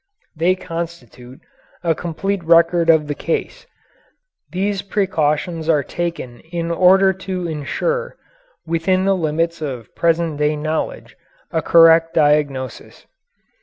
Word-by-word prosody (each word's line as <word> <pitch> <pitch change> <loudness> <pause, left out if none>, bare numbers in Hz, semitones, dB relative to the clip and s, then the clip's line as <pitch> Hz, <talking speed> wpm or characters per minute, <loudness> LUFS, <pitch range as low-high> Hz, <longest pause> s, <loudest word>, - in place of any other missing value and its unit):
They 170 +4 +2
constitute 165 -8 -8 0.4
a 165 -2 +2
complete 180 +4 -3
record 165 0 +4
of 160 -2 +5
the 145 - -3
case. 170 - -4 0.8
These 195 +1 -1
precautions 165 -5 -1
are 150 -3 +3
taken 165 -8 -5
in 170 0 -5
order 190 +2 +5
to 185 -1 -5
insure, 475 - -3 0.5
within 175 +3 0
the 195 0 +3
limits 165 0 -1
of 130 -7 -6
present 165 -2 0
day 150 +1 +1
knowledge, 160 - -4 0.4
a - - 0
correct 165 0 +5
diagnosis. 145 -4 0
165 Hz, 115 wpm, -19 LUFS, 155-185 Hz, 0.8 s, of